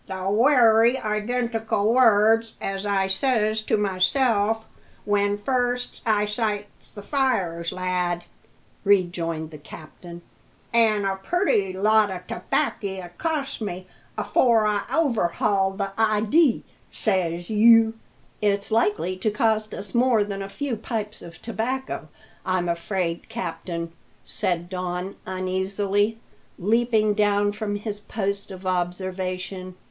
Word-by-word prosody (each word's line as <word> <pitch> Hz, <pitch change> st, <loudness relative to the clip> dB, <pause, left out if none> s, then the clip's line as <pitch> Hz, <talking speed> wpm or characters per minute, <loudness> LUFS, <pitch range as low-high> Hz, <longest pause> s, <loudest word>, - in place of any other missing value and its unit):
"The 190 Hz, -1 st, -5 dB
wery 230 Hz, +1 st, +5 dB
identical 220 Hz, -1 st, -1 dB
words 225 Hz, -2 st, +4 dB
as 195 Hz, +1 st, -3 dB
I 195 Hz, -1 st, +2 dB
says 215 Hz, +1 st, +1 dB
to 215 Hz, -, 0 dB
myself 210 Hz, +3 st, +1 dB, 0.4 s
when 205 Hz, 0 st, +1 dB
first 245 Hz, +2 st, -1 dB
I 210 Hz, -1 st, +3 dB
sights 210 Hz, -1 st, -3 dB
the 205 Hz, -, -10 dB
fires, 190 Hz, -, 0 dB
lad," 180 Hz, -1 st, -1 dB, 0.6 s
rejoined 175 Hz, -5 st, +1 dB
the 150 Hz, -, -10 dB
captain; 170 Hz, +3 st, -11 dB, 0.5 s
"an' 220 Hz, -3 st, +3 dB
a 195 Hz, 0 st, 0 dB
purty 205 Hz, -, +1 dB
lot 210 Hz, +2 st, +3 dB
o' 185 Hz, -1 st, -4 dB
tobackie 195 Hz, -2 st, -2 dB
it 175 Hz, 0 st, -16 dB
cost 305 Hz, -6 st, -2 dB
me 185 Hz, -3 st, -4 dB, 0.3 s
afore 230 Hz, -4 st, +3 dB
I 210 Hz, -1 st, +1 dB
overhauled 200 Hz, -, +1 dB
the 195 Hz, -1 st, -2 dB
idee, 225 Hz, +6 st, +3 dB, 0.3 s
says 175 Hz, -4 st, -1 dB
you." 225 Hz, +1 st, +6 dB, 0.5 s
"It's 200 Hz, 0 st, +1 dB
likely 205 Hz, -5 st, +1 dB
to 200 Hz, +4 st, 0 dB
cost 215 Hz, 0 st, +1 dB
us 200 Hz, -1 st, -6 dB
more 240 Hz, -3 st, +3 dB
than 200 Hz, -1 st, -5 dB
a 195 Hz, -, -5 dB
few 255 Hz, +3 st, -3 dB
pipes 215 Hz, -1 st, -4 dB
of 170 Hz, -, -11 dB
tobacco, 245 Hz, +3 st, -3 dB, 0.4 s
I'm 185 Hz, -1 st, 0 dB
afraid, 170 Hz, 0 st, -2 dB
captain," 170 Hz, 0 st, -5 dB, 0.3 s
said 175 Hz, -1 st, -1 dB
Don 180 Hz, +1 st, -4 dB
uneasily, 195 Hz, +3 st, 0 dB, 0.4 s
leaping 220 Hz, +1 st, +2 dB
down 205 Hz, -1 st, +2 dB
from 210 Hz, 0 st, -3 dB
his 205 Hz, 0 st, -4 dB
post 200 Hz, -1 st, -3 dB
of 190 Hz, -1 st, -10 dB
observation. 185 Hz, +1 st, -3 dB
205 Hz, 120 wpm, -24 LUFS, 185-225 Hz, 0.6 s, you